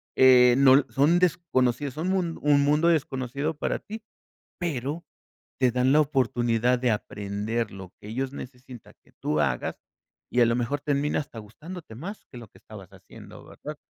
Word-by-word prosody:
eh, 125 -2 +7
no 135 -1 +7
l 140 - +3
son 150 +6 +3
desconocidas 145 -6 0
son 160 +3 -3
mun 180 -4 -1
un 145 -1 +4
mundo 150 +4 +3
desconocido 140 -1 -1
para - - -2
ti, 220 +2 -9 0.6
pero 155 -1 -3 0.6
te 130 -1 +4
dan 125 +2 +2
la 150 - +5
oportunidad 125 -4 +1
de 125 -1 +1
aprender 105 +2 -3
lo 95 -1 -10
que 105 - -11
ellos 130 +4 -3
necesitan 125 -3 -11
que - - -26
tú 75 0 0
hagas, 65 -4 -1 0.5
y 125 - +2
a 120 - +6
lo 115 +1 +1
mejor 125 +4 -2
termina 145 +1 0
hasta 140 -5 -9
gustándote 150 - -10
más 185 - -8
que 125 - -9
lo 115 -2 -11
que - - -21
estabas 100 -4 -12
haciendo, 95 -1 -14
¿verdad? - - -9
130 Hz, 175 wpm, -26 LUFS, 115-150 Hz, 0.6 s, eh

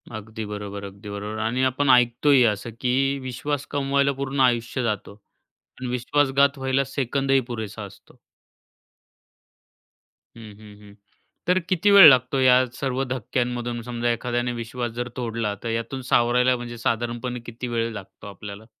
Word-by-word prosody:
अगदी 110 +1 -7
बरोबर, 105 -1 -6
अगदी 100 +1 -9
बरोबर 105 +1 -5
आणि 120 +4 0
आपण 130 +2 +1
ऐकतोय 125 +2 +5
असं, 105 +3 -6
की 135 +2 +1
विश्वास 130 +3 -4
कमवायला 140 0 +1
पूर्ण 140 0 -3
आयुष्य 120 0 +1
जातं 105 -4 -2 0.7
आणि 130 -1 -4
विश्वासघात 140 +2 +2
व्हायला 135 0 0
सेकंदही 135 0 0
पुरेसा 110 -3 -5
असतो. 100 0 -14 2.2
हं, - - -11 0.2
हं, 105 -1 -14
हं, 105 -1 -15
हं. 100 - -17 0.5
तर 180 +1 +3
किती 185 +3 +3
वेळ 200 -4 +11
लागतो? 130 0 +3
या 130 0 +5
सर्व 135 0 -2
धक्क्यांमधून 120 -1 -2
समजा 120 0 -2
एखाद्याने 120 +1 -2
विश्वास 120 +1 -4
जर 120 +1 -3
तोडल? 115 -2 -2 0.2
तर 115 - -3
यातून 115 +4 -3
सावरायला? 125 +2 +3
म्हणजे 120 0 -7
साधारणपणे 120 +2 -2
किती 120 +2 -6
वेळ 115 -1 -1
लागतो 100 -1 -10
आपल्याला? 100 +1 -9
120 Hz, 145 wpm, -24 LUFS, 115-130 Hz, 2.2 s, वेळ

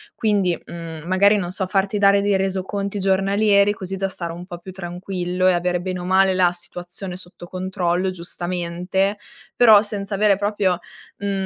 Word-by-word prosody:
Quindi, 200 -6 +1
mhmm, 165 -2 -8
magari, 200 +3 +4
non 175 -3 -3
so, 190 +1 -1
farti 195 +1 0
dare 200 0 +5
dei 200 -1 +2
resoconti 195 +1 -2
giornalieri 200 +2 +3
così 195 -1 -6
da 195 0 -1
stare 170 -3 -5
un 175 +1 -8
po' 175 -1 -8
più 185 +2 -10
tranquillo 180 0 -2
e 185 - +5
avere 175 0 0
bene 185 0 -3
o 175 - -6
male 190 +1 +4
la 185 -1 +3
situazione 175 +1 -6
sotto 175 -1 -11
controllo 185 0 -1
giustamente. 180 +2 -2 0.4
Però 220 -4 +7
senza 205 -1 -3
avere 205 0 +4
proprio, 200 -3 0 0.4
mhmm, 200 0 -3
190 Hz, 170 wpm, -21 LUFS, 180-200 Hz, 0.4 s, Però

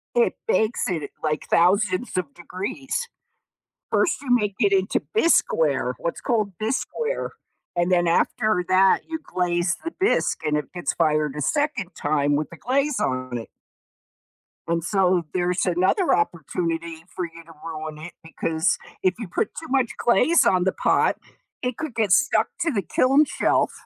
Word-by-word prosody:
It 475 -1 +3
bakes 220 - +1
at, 160 -5 -3
like, 155 -1 -1
thousands 185 +4 +2
of 155 -6 -2
degrees. 260 - -4 0.8
First 330 - +1
you 275 - -9
make 210 -4 +1
it 200 -2 +3
into 190 0 +2 0.2
bisqueware 470 +5 +2
what's - - -3
called 215 -6 0
bisqueware, 450 - -2 0.5
and 175 +1 +1
then 175 -1 +3
after 215 +1 +1
that 190 +1 +5
you 320 0 -3
glaze 175 -4 0
the 330 - -3
bisque 390 - +1
and 150 -1 +1
it 150 -3 -4
gets 175 -1 -2
fired 150 -3 +1
a - - -3
second 290 - -1
time 145 -1 +1
with 155 - -2
the 170 - -10
glaze 275 - 0
on 130 - -2
it. 115 - -8 1.2
And, 165 -1 0
so, 185 -2 +2
there's 180 0 0
another 185 - +2
opportunity 165 - -2
for 180 - -2
you 165 0 -11
to 165 - -14
ruin 155 -1 -6
it 175 +3 -9
because 160 0 0 0.2
if 185 0 +2
you 225 - -5
put - - -1
too 320 0 -9
much 260 -3 +1
glaze 315 +8 +4
on 185 -1 +3
the 190 - +2
pot - - +2 0.4
it 250 -2 -2
could 310 -6 -5
get 215 -5 +1
stuck 290 +7 +4
to 335 - +1
the 205 -5 0
kiln 270 - +3
shelf. - - +1
185 Hz, 160 wpm, -23 LUFS, 165-255 Hz, 1.2 s, that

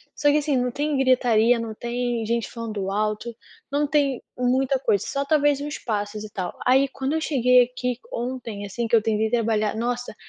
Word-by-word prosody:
Só 290 -1 +2
que 295 - +3
assim, 295 -1 0
não 250 0 0
tem 295 +2 -1
gritaria, 245 -3 +3
não 225 -1 -4
tem 240 0 -2
gente 230 +1 -1
falando 215 -5 -4
alto, 215 +3 -2 0.4
não 290 +1 +1
tem 280 -3 +1
muita 260 +2 +1
coisa, 205 -7 +1
só 280 0 -2
talvez 290 -1 +3
uns 295 +1 -4
passos 210 -1 -3
e 215 - -8
tal. 185 -3 -5
Aí 265 +2 +4
quando 265 +1 -3
eu 320 - +1
cheguei 250 -4 +4
aqui 250 0 -3
ontem, 235 -4 -4
assim, 230 +4 -3
que 230 - +3
eu 225 - +5
tentei 220 0 0
trabalhar, 220 -2 +1
nossa, 240 0 -3
245 Hz, 195 wpm, -24 LUFS, 220-270 Hz, 0.4 s, eu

